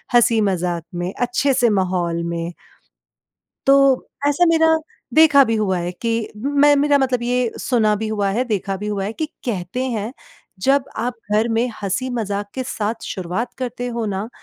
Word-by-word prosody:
हँसी 235 Hz, -1 st, +5 dB
मजाक 180 Hz, -4 st, -1 dB
में 175 Hz, +2 st, -3 dB
अच्छे 245 Hz, +3 st, +1 dB
से 240 Hz, -2 st, +3 dB
माहौल 180 Hz, -4 st, 0 dB
में। 170 Hz, 0 st, -3 dB, 1.1 s
तो 275 Hz, -1 st, +5 dB, 0.2 s
ऐसा 290 Hz, +5 st, +3 dB
मेरा 320 Hz, -1 st, +4 dB, 0.4 s
देखा 300 Hz, -3 st, +7 dB
भी 225 Hz, -, 0 dB
हुआ 195 Hz, -4 st, 0 dB
है 175 Hz, +1 st, -3 dB
कि 230 Hz, -, 0 dB, 0.3 s
मैं 285 Hz, +4 st, +4 dB
मेरा 285 Hz, 0 st, +3 dB
मतलब 255 Hz, -3 st, 0 dB
ये 245 Hz, -1 st, +1 dB
सुना 220 Hz, -4 st, +2 dB
भी 220 Hz, +1 st, -3 dB
हुआ 205 Hz, -2 st, 0 dB
है 240 Hz, +5 st, 0 dB
देखा 200 Hz, -4 st, -2 dB
भी 210 Hz, +2 st, -6 dB
हुआ 200 Hz, -2 st, -2 dB
है 210 Hz, -, -3 dB
कि 315 Hz, -, -3 dB, 0.2 s
कहते 215 Hz, +3 st, -2 dB
हैं, 220 Hz, +1 st, -3 dB, 0.5 s
जब 270 Hz, +7 st, +2 dB
आप 245 Hz, +1 st, -2 dB, 0.2 s
घर 220 Hz, +2 st, +3 dB
में 235 Hz, +2 st, +2 dB, 0.2 s
हँसी-मजाक 205 Hz, -1 st, -2 dB
के 260 Hz, -, -2 dB
साथ 225 Hz, -2 st, -3 dB
शुरुआत 190 Hz, +7 st, -3 dB
करते 245 Hz, -1 st, -4 dB
हो 230 Hz, -, -1 dB
ना 195 Hz, +3 st, -3 dB
225 Hz, 170 wpm, -20 LUFS, 195-255 Hz, 1.1 s, देखा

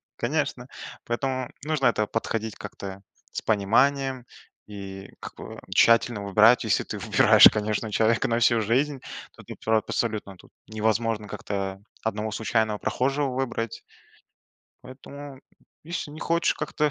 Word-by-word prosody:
конечно, 130 Hz, -1 st, -2 dB, 0.4 s
поэтому 130 Hz, +1 st, -2 dB
нужно 150 Hz, -5 st, +1 dB
к -, -, +3 dB
этому 105 Hz, -2 st, -1 dB
подходить 110 Hz, -1 st, -3 dB
как-то 100 Hz, 0 st, -8 dB, 0.3 s
с -, -, -3 dB
пониманием 130 Hz, +5 st, +1 dB, 0.4 s
и 100 Hz, -1 st, -9 dB
к -, -, -8 dB
к -, -, -9 dB, 0.2 s
тщательно 115 Hz, -2 st, +4 dB
выбирать. 105 Hz, +5 st, +5 dB
Если 110 Hz, -, +1 dB
ты -, -, -5 dB
выбираешь, -, -, +7 dB
конечно, 105 Hz, +1 st, -2 dB
человека 115 Hz, +2 st, +2 dB
на 115 Hz, -, +1 dB
всю 115 Hz, -1 st, +4 dB
жизнь, 130 Hz, +6 st, +1 dB, 0.3 s
то -, -, -15 dB
ты -, -, -9 dB
про 110 Hz, 0 st, +3 dB
абсолютно 105 Hz, -4 st, -3 dB
тут -, -, -19 dB, 0.2 s
невозможно 110 Hz, 0 st, -1 dB
как-то 95 Hz, 0 st, -4 dB, 0.2 s
одного 110 Hz, 0 st, -2 dB
случайного 110 Hz, 0 st, 0 dB
прохожего 135 Hz, +6 st, 0 dB
выбрать, 125 Hz, -3 st, -3 dB, 1.0 s
поэтому, 140 Hz, +1 st, -11 dB, 0.4 s
если 165 Hz, -2 st, -4 dB
не 155 Hz, -, -10 dB
хочешь 170 Hz, 0 st, +1 dB
как-то, 150 Hz, -1 st, -1 dB
115 Hz, 135 wpm, -25 LUFS, 105-130 Hz, 1.0 s, выбираешь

